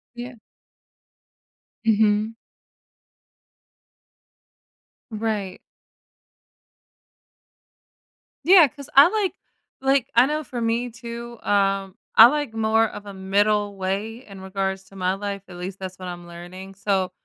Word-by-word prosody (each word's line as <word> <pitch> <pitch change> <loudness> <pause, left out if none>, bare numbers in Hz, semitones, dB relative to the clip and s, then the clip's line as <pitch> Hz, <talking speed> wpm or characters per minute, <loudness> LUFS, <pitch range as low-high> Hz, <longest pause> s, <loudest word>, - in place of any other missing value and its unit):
Yeah. 245 +1 -7 1.5
Mhm. 215 0 +2 2.8
Right. 210 -4 -3 2.9
Yeah 355 -3 +8
'cause 280 +2 -12
I 280 +3 +9
like 410 -2 -1 0.5
like, 270 -1 +2
I 240 +2 +7
know 305 +2 -2
for 250 -3 -6
me 230 +2 0
too, 235 0 -8
um, 195 -1 +1 0.2
I 225 - +11
like 290 -3 -2
more 225 0 +2
of 210 - -10
a 200 - -8
middle 205 +2 +1
way 200 +6 -4
in 195 -2 -12
regards 190 0 -3
to 195 - -18
my 185 -1 0
life, 200 0 -5
at 180 - -11
least 185 +2 -6
that's 185 -1 -7
what 185 - -7
I'm 175 -1 -8
learning, 180 +3 -10
so, 195 -2 0
210 Hz, 115 wpm, -23 LUFS, 190-235 Hz, 2.9 s, I